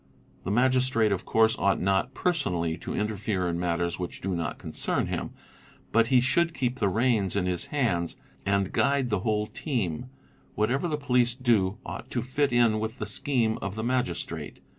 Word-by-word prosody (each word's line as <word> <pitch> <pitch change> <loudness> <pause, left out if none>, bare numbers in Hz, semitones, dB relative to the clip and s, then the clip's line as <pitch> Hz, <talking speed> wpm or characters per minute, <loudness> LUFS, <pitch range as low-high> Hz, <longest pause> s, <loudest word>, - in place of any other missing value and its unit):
'The - - -2
Magistrate 125 -1 +3
of 95 -2 -1
course 110 0 +3
ought 100 -2 +2
not 95 +7 +1
personally 90 - 0
to - - -6
interfere 105 -3 -1
in 85 0 -1
matters 85 0 -1
which 90 - -5
do 95 -1 -2
not 85 -3 -3
concern - - -2
him; - - -3 0.6
but 115 0 +4
he 130 +1 +5
should 165 +7 +2
keep 125 -1 -1
the 100 - +2
reins 110 -3 +1
in 100 -3 +1
his 90 -2 -1
hands 95 - 0 0.3
and 100 -1 +1
guide 140 -3 +2
the 105 - +2
whole 105 +1 0
team; 115 - -3 0.5
whatever 125 +10 +1
the 155 -2 -1
police 125 -4 +2
do 110 -6 +2
ought - - -7
to 120 - -2
fit 140 +2 0
in 120 -3 +4
with 110 +1 -3
the 110 - -3
scheme 115 +1 0
of 100 0 -4
the 110 - -3
Magistrate. 85 - -2
110 Hz, 180 wpm, -27 LUFS, 95-125 Hz, 0.6 s, he